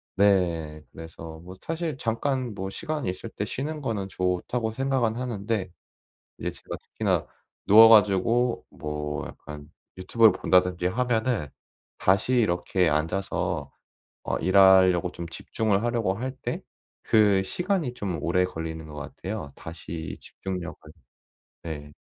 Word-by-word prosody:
네. 85 -6 +2
그래서 80 0 -9
뭐 90 +2 -11
사실 165 - -3
'잠깐 125 +1 -1
뭐 95 -1 -4
시간이 150 - -3
있을 90 - -5
때 105 - -3
쉬는 150 +7 -4
거는 110 -7 -2
좋다.'고 95 +6 -1
생각은 130 -2 0
하는데 110 -6 -2 0.7
이제 - - -2
제가 - - -8
특히나 - - -1 0.4
누워 110 +2 +9
가지고 115 +3 +4
뭐 75 0 -4
약간 75 0 -11 0.3
유튜브를 110 +4 +5
본다든지 90 -1 +2
하면은 115 - 0 0.5
다시 100 +7 +2
이렇게 90 -5 +2
앉아서 80 +6 -1 0.5
어 - - -1
일하려고 95 -1 +5
좀 85 -1 -7
집중을 105 +3 -1
하려고 115 -5 0
할 130 +5 -4
때 - - -3 0.4
그 105 -3 +4
시간이 180 - -1
좀 100 -9 -4
오래 90 +2 +2
걸리는 80 -2 -6
것 75 - -10
같아요. 80 +2 -6
다시 80 -1 -7
집중력을 90 -2 -6 0.9
네. 75 -3 -7
95 Hz, 265 characters per minute, -26 LUFS, 85-115 Hz, 0.9 s, 누워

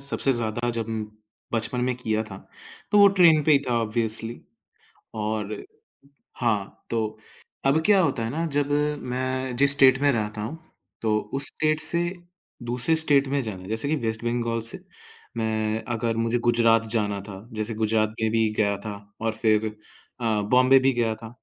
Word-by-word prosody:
सबसे 140 -1 -1
ज़्यादा 120 0 -2
जब 115 -2 -3 0.7
बचपन 120 +2 -1
में 130 0 0
किया 110 -3 -1
था 95 - -7 0.5
तो 210 - +4
वो 200 - +9
ट्रेन 160 -4 +6
पे 155 - +4
ही 140 - +6
था 120 -1 +2
ऑब्वियसली 115 +1 -2 0.8
और 105 -1 -2 0.8
हाँ, 105 -5 -2
तो 110 -2 -2 0.5
अब 140 +4 +3
क्या 200 -2 +5
होता 135 -8 0
है 115 - -2
ना 160 +7 -2
जब 145 0 0 0.4
मैं 130 0 -2
जिस 140 +1 +6
स्टेट 135 -2 +5
में 145 0 +4
रहता 105 -3 -2
हूँ, 130 +10 -5 0.4
तो 110 -1 +1 0.2
उस 140 +1 +1
स्टेट 155 0 0
से 170 +2 +1 0.6
दूसरे 125 +7 +1
स्टेट 145 -3 +3
में 140 +1 0
जाना 100 -5 -6
है, 95 - -10
जैसे 110 +5 -1
कि 155 - +2
वेस्ट 110 0 -2
बंगाल 120 -1 -1
से - - -7 0.6
मैं 110 -1 -1
अगर 115 0 -1
मुझे 115 +1 +1
गुजरात 115 -1 +4
जाना 105 -3 0
था, 100 +1 -10
जैसे 110 +1 -3
गुजरात 110 0 +1
में 110 - +2
भी 115 -1 +2
गया 100 -2 +1
था 105 -1 -4 0.3
और 115 -1 0
फिर 110 -1 +3 0.5
अ, 110 -3 0
बॉम्बे 130 +5 +5
भी 135 +1 +3
गया 115 -2 0
था, 110 +1 -10
115 Hz, 175 wpm, -25 LUFS, 110-135 Hz, 0.8 s, वो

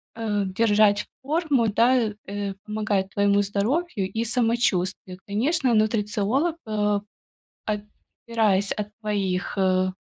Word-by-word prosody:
э, 215 -3 -1
держать 205 +1 +3 0.2
форму, 285 -4 +1
да, 235 +1 +3 0.2
э, 200 0 -3
помогает 210 -3 -1
твоему 200 0 +3
здоровью 205 - -1
и 225 +1 -2
самочувствию. 215 -6 0
Конечно, 255 +6 +1
нутрициолог, 220 +8 +1
а, 210 -2 0 0.6
отпираясь 210 -1 -1
от 210 -1 -4
твоих, 200 -4 -2
э, 185 -1 +2
210 Hz, 100 wpm, -24 LUFS, 200-230 Hz, 0.6 s, держать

